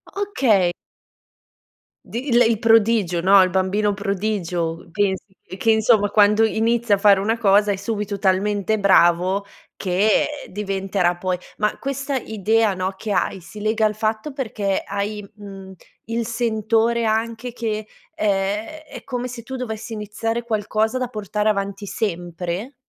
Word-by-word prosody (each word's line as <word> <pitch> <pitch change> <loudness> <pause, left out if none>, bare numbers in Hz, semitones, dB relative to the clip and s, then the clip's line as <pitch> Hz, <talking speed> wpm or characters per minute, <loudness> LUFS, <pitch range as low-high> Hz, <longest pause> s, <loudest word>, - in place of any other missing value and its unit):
Okay. 250 - +2 1.3
Di 250 +3 -4
lei 235 -2 +4
prodigio, 225 -6 +3
no, 190 +2 +6
il 185 - +1
bambino 195 +3 +1
prodigio. 190 -5 -2
Pensi 190 +1 -1 0.2
che 185 - -10
che, 225 +3 +3
insomma, 220 -1 +4
quando 210 +1 +4
inizia 225 0 +2
a - - -5
fare 200 -1 +5
una 220 +4 0
cosa 205 -1 +4
è - - -2
subito 205 0 -3
talmente 200 +2 +1
bravo 185 0 +3 0.3
che 195 +3 +2 0.2
diventerà 195 -2 -1
poi 185 0 -1 0.2
ma 210 0 0
questa 275 0 -3
idea, 220 -1 +1
no, 185 +1 -2
che 210 +2 -5
hai, 190 -1 0
si 210 +5 -11
lega 215 +1 +1
al 210 -1 0
fatto 220 +5 -2
perché 215 -7 -2
hai, 200 +1 -4
mhmm, 195 -2 -10 0.3
il 230 0 -2
sentore 230 0 +1
anche 225 +2 -1
che, 215 -3 -3 0.3
ehm, 200 +1 0 0.2
è - - -9
come 250 -1 -4
se 240 -1 -8
tu 265 +2 -7
dovessi 220 -2 -5
iniziare 225 +2 -3
qualcosa 220 +1 -1
da 255 - -1
portare 210 -1 -2
avanti 200 0 -2
sempre? 180 - -4
210 Hz, 140 wpm, -21 LUFS, 195-225 Hz, 1.3 s, no